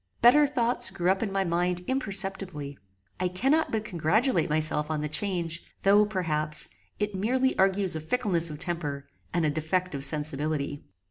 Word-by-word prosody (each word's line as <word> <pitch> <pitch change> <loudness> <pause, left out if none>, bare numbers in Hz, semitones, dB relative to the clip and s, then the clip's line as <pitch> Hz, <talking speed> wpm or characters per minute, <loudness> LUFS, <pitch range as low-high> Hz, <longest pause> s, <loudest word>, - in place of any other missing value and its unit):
Better 290 +5 +6
thoughts 245 -3 +3
grew 175 +1 0
up 190 - -1
in 215 -4 -2
my 195 0 0
mind 175 0 0
imperceptibly. 195 - +1 0.4
I 185 - +1
cannot 270 - +1
but 215 -1 -2
congratulate 210 - +1
myself 150 0 0
on 155 -1 -2
the 150 - -2
change, 170 0 -2 0.2
though, 205 +1 +5
perhaps, 155 -6 -1 0.3
it 210 0 -2
merely 255 +7 0
argues 190 -2 +2
a 160 - -4
fickleness 175 -3 +1
of 150 - -7
temper, 150 -4 -3 0.3
and 170 -2 0
a 150 - +1
defect 170 +4 -2
of 140 -1 -4
sensibility. 145 0 -1
180 Hz, 160 wpm, -27 LUFS, 155-210 Hz, 0.4 s, Better